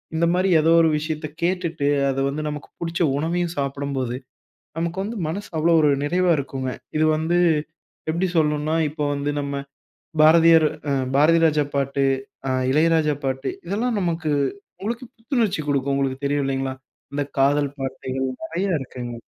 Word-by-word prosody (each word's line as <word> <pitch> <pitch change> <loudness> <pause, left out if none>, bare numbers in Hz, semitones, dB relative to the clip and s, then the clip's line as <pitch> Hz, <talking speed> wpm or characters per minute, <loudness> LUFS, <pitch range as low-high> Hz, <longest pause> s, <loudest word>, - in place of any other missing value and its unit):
இந்தமாரி 175 +3 +2
ஏதோ 165 +1 +3
ஒரு 160 - +4
விஷயத்த 155 0 -3 0.2
கேட்டுட்டு 170 -5 0 0.2
அது 135 0 -1
வந்து 150 +2 -3
நமக்கு 150 -1 -7
பிடித்த 170 0 -3 0.2
உணவையும் 170 +2 -1
சாப்பிடும்போது, 140 -3 -2 0.6
நமக்கு 170 +2 -2
வந்து 225 +2 -5
மனசு 200 +6 -4
அவ்வளவு 165 +1 +4
ஒரு 150 - +5
நிறைவாக 175 +1 +2
இருக்குங்க. 135 -2 -3 0.3
இது 155 - +3
வந்து 165 +3 +1 0.7
எப்பிடி 175 +4 +1
சொல்லணுன்னா, 150 0 +1
இப்ப 150 +1 -11
வந்து 145 +1 -1
நம்ம 140 0 -4 0.7
பாரதியர், 165 0 +7 0.2
அ - - +2 0.2
பாரதிராஜா 155 0 +4
பாட்டு 140 0 0 0.4
அ - - 0 0.2
இளையராஜா 155 0 +3
பாட்டு 130 0 -1 0.2
இதெல்லாம் 220 +4 -1
நமக்கு 170 -3 -1 0.5
உங்களுக்கு 235 +5 -3
புத்துணர்ச்சி 225 - 0
கொடுக்கும். 140 -1 +1
உங்களுக்கு 135 0 -2
தெரியும் 145 0 0
இல்லேங்களா! 135 -1 -2 0.4
அந்த 145 0 -1 0.2
காதல் 145 +1 +3
பாட்டுகள் 130 0 -3 0.2
நிறைய 190 -1 -2
இருக்குங்க. 125 -2 -6
155 Hz, 140 wpm, -23 LUFS, 140-170 Hz, 0.7 s, பாரதியர்